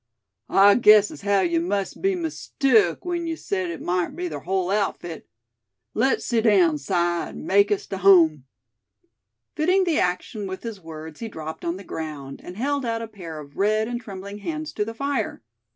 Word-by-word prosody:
"I 200 +1 +7
guessed 210 -2 +6
as - - -10
haow 200 -1 +2
yuh 170 -2 +1
must 195 +3 -2
a - - -15
be'n 385 -3 0
mistook 240 - +1
w'en 345 -1 -3
yuh 325 - -2
said 185 - -3
it 170 - -6
mout 180 +8 -1
be 355 +2 -3
ther - - -5
hull 190 -1 -1
outfit. 190 -5 -2 0.6
Les 260 +5 +1
sit 230 -2 +1
down, 180 -8 +4
Si, 140 - -9
an' 175 -1 -1
make 200 +2 +4
us 205 - 0
tuh 195 - -5
hum." 165 -8 +5 1.1
Fitting 360 +5 +3
the 340 -4 +1
action 180 +3 -2
with 190 0 -6
his 225 -4 -6
words 160 -1 -9
he 230 - -4
dropped 160 -5 -7
on 170 +1 -2
the 195 - -10
ground, 150 -6 -6
and 180 +2 -9
held 280 +3 -1
out 230 -1 -2
a - - -5
pair 180 -7 -9
of 145 -1 -12
red 215 +2 +2
and 240 0 -4
trembling 200 -1 -8
hands 310 +7 -5
to 210 - 0
the 225 +2 -6
fire. 275 - -2
200 Hz, 195 wpm, -24 LUFS, 175-230 Hz, 1.1 s, I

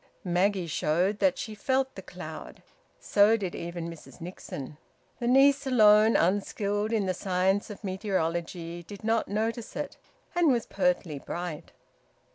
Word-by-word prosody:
Maggie 185 +1 +1
showed 175 +6 0
that 275 -2 +3
she 220 - -5
felt 265 +4 0
the - - -8
cloud. - - -9 0.4
So 210 +2 +4
did 190 -5 -4
even 170 0 -5
Mrs 165 +1 -11
Nixon. 150 -5 -8 0.4
The 235 - -2
niece 275 +2 +5
alone, 215 -3 +6
unskilled 205 +3 +1
in 215 -3 +1
the 185 - 0
science 190 +2 0
of 210 +1 -9
meteorology, 175 -3 -2
did 200 +5 -11
not 225 0 +1
notice 225 +3 -2
it, - - -4 0.4
and 350 -1 +3
was 240 -3 +1
pertly 235 - 0
bright. 175 -3 -5
200 Hz, 140 wpm, -28 LUFS, 175-225 Hz, 0.4 s, alone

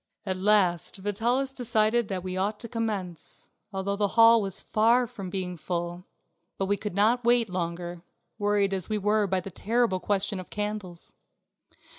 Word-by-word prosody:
At 190 -2 -1
last 185 -4 +2
Vitalis 235 +7 0
decided 235 -2 +2
that 185 -3 -3
we 185 -1 -4
ought 205 +3 -1
to 235 - -5
commence, 205 -8 -4 0.2
although 195 0 -2
the 205 0 +1
hall 230 0 +8
was 195 -2 -3
far 230 +3 +3
from 210 -6 -8
being 180 -1 -3
full; 175 +2 -4 0.5
but 195 - 0
we 200 +1 +1
could 205 -2 -5
not 225 +5 +3
wait 235 -3 +3
longer, 175 -1 -4 0.4
worried 205 -1 +2
as 190 -3 -3
we 215 - 0
were 210 0 +2
by 190 0 +1
the 195 - -8
terrible 225 0 +1
question 200 +1 0
of 185 - -9
candles. 205 -4 -5
200 Hz, 165 wpm, -27 LUFS, 185-220 Hz, 0.5 s, hall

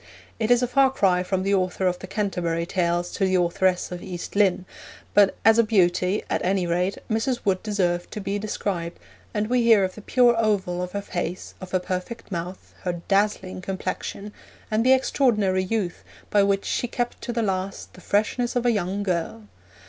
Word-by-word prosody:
It 220 0 0
is 245 0 +4
a - - +2
far 270 +2 +4
cry 190 -8 +2
from 185 0 -1
the 200 +1 +1
author 185 0 0
of 180 -1 +1
the 190 - -8
Canterbury 180 -5 -1
Tales 175 -1 0
to - - -2
the 190 0 +1
authoress 180 +1 +1
of 175 -1 -5
East 180 -1 -7
Lynne; 190 -3 +3 0.5
but 200 -1 +5
as 225 +1 +6
a - - +7
beauty, 185 -2 +2
at - - -1
any 185 0 +1
rate, 180 +3 0
Mrs. 240 +3 -1
Wood 190 -2 +1
deserved 180 -5 -1
to - - -6
be 200 0 -2
described, 190 -5 -3 0.3
and 210 -1 -1
we 250 +1 +2
hear 225 -4 +5
of 185 -1 -1
the 215 - -10
pure 240 +2 +4
oval 195 -5 0
of 180 0 -5
her 200 0 -3
face, 180 -1 -4
of 185 - -7
her 185 - +1
perfect 185 +5 -5
mouth, 180 +1 -6
her 180 - -2
'dazzling' 195 -2 0
complexion, 195 +2 -5 0.4
and 215 +1 +2
the 260 +2 +6
extraordinary 215 -8 +2
youth 190 -3 -2 0.3
by 205 - +5
which 200 0 +1
'she 245 - -1
kept 240 +1 -3
to - - -4
the 230 -1 -1
last 190 -1 -3
the... 185 - -14
freshness 225 +6 0
of 245 0 0
a 240 - +5
young 200 -1 -1
girl.' 170 - -2
195 Hz, 195 wpm, -24 LUFS, 180-215 Hz, 0.5 s, a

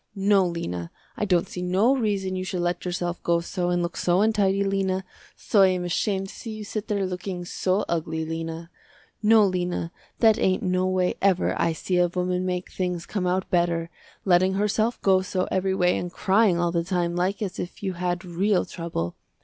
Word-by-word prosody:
No, 195 -1 +3
Lena, 90 - -4 0.3
I - - -1
don't 180 -4 +2
see 180 - -6
no 190 +9 +3
reason 200 -6 -1
you 185 - -2
should 185 -1 -3
let 175 +1 -1
yourself 175 -1 -3
go 170 0 +2
so 175 +1 -2
and 175 0 +1
look 170 - -3
so 180 +2 +2
untidy 200 -2 +2
Lena, 195 -1 0 0.3
so 205 - +2
I 190 - +8
am 185 -1 0
ashamed 190 +2 -1
to - - -10
see 230 - -7
you 215 0 -6
sit 210 +1 -5
there 200 -2 0
looking 180 -1 -4
so 185 +3 0
ugly, 160 -1 -2
Lena. 165 +1 -5 0.5
No 220 0 +6
Lena 180 -3 -2 0.3
that 225 -1 +4
ain't 185 0 +1
no 185 0 +1
way 185 -1 +1
ever 190 -2 +2
I 165 - +1
see 180 +3 -1
a 175 - +4
woman 180 +1 -1
make 180 0 -3
things 180 -2 -2
come 190 -4 -2
out 185 +1 0
better, 170 -1 +1 0.3
letting 185 0 +4
herself 215 +3 +1
go 190 -1 +4
so 185 0 -2
every 190 0 +1
way 180 -1 +3
and 175 - -5
crying 195 -1 +3
all 175 0 +1
the 170 -1 0
time 175 -1 -1
like 185 +3 0
as 190 -3 -5
if 180 - -6
you 190 -2 -1
had 175 +1 -2
real 185 +3 +1
trouble. 165 - -4
185 Hz, 200 wpm, -25 LUFS, 175-195 Hz, 0.5 s, I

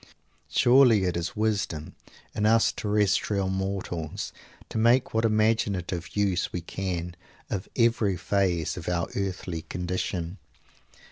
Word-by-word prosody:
Surely 120 -5 +5
it 90 -2 0
is 85 0 -3
wisdom, 105 -8 -1 0.4
in 105 0 +1
us 115 +1 +4
terrestrial 105 -1 +1
mortals, 95 -4 -3 0.3
to 110 - -3
make 120 +3 +3
what 110 +1 +2
imaginative 105 -5 0
use 95 -3 +1
we 90 - -3
can 90 -1 -4 0.4
of 95 -2 -3
every 115 -5 +2
phase 90 -3 0
of 90 - -4
our 85 -1 -1
earthly 95 -4 -3
condition? 90 +1 -3
95 Hz, 120 wpm, -27 LUFS, 90-110 Hz, 0.4 s, Surely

